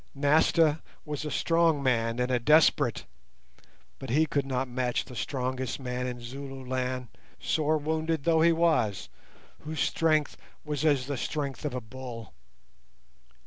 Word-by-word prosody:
Nasta 155 +2 +3 0.2
was 150 0 -4
a - - -2
strong 165 -2 +2
man 115 -2 +1
and 125 +1 0
a 125 - +2
desperate, 145 -2 +3 0.9
but - - -7
he 150 +6 +3
could 140 -2 -1
not 130 0 -1
match 125 0 -1
the 125 - -11
strongest 130 +1 -3
man 125 -1 -3
in 125 -1 -5
Zululand, 130 -1 -4 0.3
sore 155 0 +1
wounded 160 0 -1
though 160 0 +3
he 170 +1 +6
was, 160 - +1 0.5
whose 155 0 -6
strength 155 +1 +1 0.3
was 150 -2 -3
as 145 -5 +3
the 140 0 -3
strength 140 +3 -3
of 140 -4 -2
a 125 - -3
bull. 120 0 -9
140 Hz, 145 wpm, -28 LUFS, 125-155 Hz, 0.9 s, he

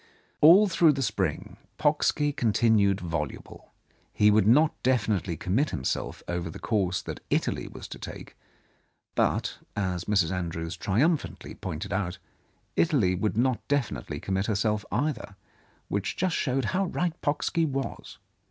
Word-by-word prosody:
All 180 +8 +8
through 165 -4 +4
the 135 -1 -2
spring 95 - -2 0.2
Pocksky 150 -1 +2
continued 110 -4 +3
voluble. 85 -4 -5 0.4
He 105 0 +4
would 105 -1 +4
not 150 +7 +5
definitely 105 -9 +1
commit 130 - 0
himself 65 - -3
over 85 -1 -3
the - - -8
course 95 -6 0
that - - -6
Italy - - 0
was - - -9
to - - -8
take, - - -9 0.8
but, - - 0 0.2
as 95 -3 -2
Mrs. 95 -5 +2
Andrews 85 -1 -3
triumphantly 135 - 0
pointed 90 +3 -5
out, 95 -2 -2 0.6
Italy 135 - +3
would 100 +2 -1
not 125 -1 +2
definitely 120 - -2
commit 95 +1 -1
herself 105 0 0
either, 125 -4 -2 0.5
which 100 0 -2
just 185 -2 0
showed 135 -1 0
how 195 +1 +2
right 175 -1 -1
Pocksky 150 +3 0
was. 135 -2 -4
105 Hz, 135 wpm, -27 LUFS, 90-145 Hz, 0.8 s, All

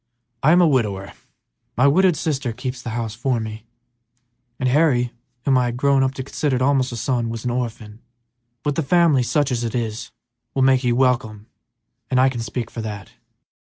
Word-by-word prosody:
I 150 - +4
am 175 +1 +6
a - - +5
widower; 105 -9 0 0.6
my 130 - +4
widowed 180 +4 +4
sister 140 -6 -2
keeps 125 +2 -5
house 115 -2 -4
for 125 +2 -1
me, 110 0 -7 0.9
and 130 - 0
Harry, 125 -3 +2 0.3
whom 135 -2 +4
I 125 - +1
had 120 0 -3
grown 140 +1 +3
to 130 0 -1
consider 130 -1 -1
almost 135 -2 +2
a - - -5
son, 120 -1 -1
was 115 +1 -6
an 125 - 0
orphan. 115 -3 -5 0.6
But 145 - 0
the 165 - -1
family, 160 -2 +3
such 140 +3 +1
as 120 -1 -1
it 115 0 -3
is, 115 -2 -3 0.5
will 135 - +2
make 130 0 +4
you 120 -1 +2
welcome; 120 -5 0 0.6
I 130 +1 +4
can 120 -3 -5
speak 115 +1 -4
for 115 - -5
that. 105 -3 -7
125 Hz, 180 wpm, -21 LUFS, 115-135 Hz, 0.9 s, am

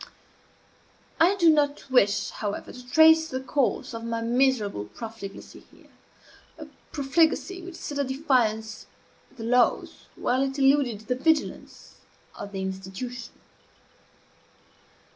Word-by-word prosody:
I 350 +5 +5
do 340 -4 +5
not 290 -2 0
wish, 205 -5 +3
however, 205 -2 -5
to 250 0 -12
trace 320 +1 +6
the 260 - -3
course 265 -1 -1
of 230 0 -6
my 230 0 -2
miserable 235 - +1
profligacy 200 - -9
here - - -21 0.7
a - - -8 0.3
profligacy 325 +6 +1
which 355 0 -9
set 290 -3 -5
at 280 - 0
defiance 235 -6 0 0.5
the 225 - -7
laws, 245 +1 +1
while 255 +2 0
it 270 0 -2
eluded 270 -5 +2
the 225 +3 -2
vigilance, 305 +4 -2 0.4
of 205 - -8
the 195 -1 -4
institution. 190 +6 -6
255 Hz, 120 wpm, -26 LUFS, 220-290 Hz, 0.7 s, trace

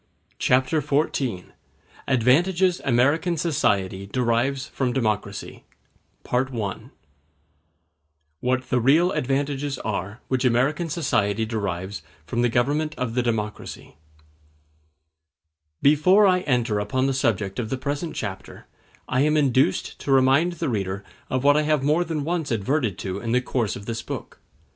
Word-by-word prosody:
Chapter 130 +4 +2
XIV: 140 - -1 0.6
Advantages 170 +9 +3
American 145 +8 +2
Society 100 - 0
Derive 125 +4 0
From 130 -3 -2
Democracy—Part 110 +3 -4
I 105 -6 -3 1.6
What 130 +2 -1
The 125 - +3
Real 155 +9 +4
Advantages 140 0 -1
Are 105 0 -4
Which 130 0 0
American 135 +7 +1
Society 110 - 0
Derives 100 -3 -3 0.2
From 120 +8 -1
The 120 - +3
Government 145 +6 0
Of 125 -3 -2
The 125 - +1
Democracy 110 -3 -4 1.9
Before 180 +8 +5
I 185 -2 +4
enter 120 - 0
upon 130 +6 0
the 135 - +1
subject 105 -6 0
of 110 -3 -3
the 130 - -2
present 145 +5 -3
chapter 95 -3 -6 0.4
I 130 0 +1
am 150 +1 +3
induced 135 -2 +1
to 140 - -3
remind 135 +6 +4
the 170 - -3
reader 100 -3 -2 0.3
of 130 0 -1
what 145 0 +5
I 150 - +4
have 150 -2 +1
more 155 +5 +3
than 160 -4 -3
once 165 -1 -2
adverted 115 - 0
to 95 +1 -4
in 115 +2 -2
the 125 - +4
course 120 -5 -1
of 100 - -9
this 115 0 -4
book. - - -7
130 Hz, 135 wpm, -24 LUFS, 110-145 Hz, 1.9 s, Before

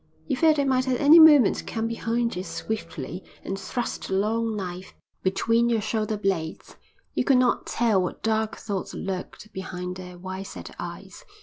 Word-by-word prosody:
You 280 - 0
felt 315 +3 +4
they 285 -2 +1
might 260 -1 +2
at 255 -1 +1
any 300 +4 +8
moment 295 -9 +7
come 225 0 -2
behind 230 0 -1
you 180 - -3
swiftly 185 -6 -5 0.2
and 195 0 -4
thrust 240 +4 -4
a 190 - 0
long 220 +3 0
knife 185 -2 -6 0.3
between 230 +5 +2
your 230 -2 +2
shoulder 215 0 -1
blades. 185 -6 -3 0.4
You - - +1
could 270 - +4
not 250 -1 +2
tell 225 -5 +2
what 180 - -4
dark 220 0 0
thoughts 200 -4 -4
lurked 195 +3 -6
behind 180 -1 -5
their 180 -1 -9
wide 190 +2 -6
set - - -9
eyes. - - -8
220 Hz, 175 wpm, -25 LUFS, 190-240 Hz, 0.4 s, any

